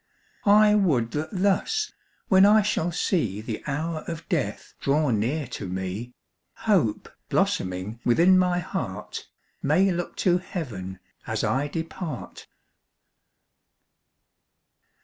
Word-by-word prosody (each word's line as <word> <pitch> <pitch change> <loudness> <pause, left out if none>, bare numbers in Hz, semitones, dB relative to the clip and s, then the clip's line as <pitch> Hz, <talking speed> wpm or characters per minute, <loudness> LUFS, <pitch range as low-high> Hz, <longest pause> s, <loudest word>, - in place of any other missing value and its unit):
I 210 +1 +7
would 145 - +2
that 150 +1 -3
thus, 205 - +1 0.4
when 190 -1 +6
I 210 +1 +6
shall 175 -4 0
see 150 - 0
The 110 0 -5
hour 155 +3 -2
of 165 -2 -6
death - - -2
draw 145 0 +2
near 125 +8 0
to 105 -5 -5
me, 95 +6 -4 0.5
Hope, 180 - +2 0.2
blossoming 95 +5 -1
within 170 +10 +5
my 180 -1 +3
heart, 175 - -5 0.3
May 180 +7 +3
look 175 0 -3
to 180 -1 +4
heaven 105 - -6 0.3
as - - -1
I 135 +3 +1
depart. 160 -2 -6
160 Hz, 110 wpm, -25 LUFS, 115-185 Hz, 0.5 s, I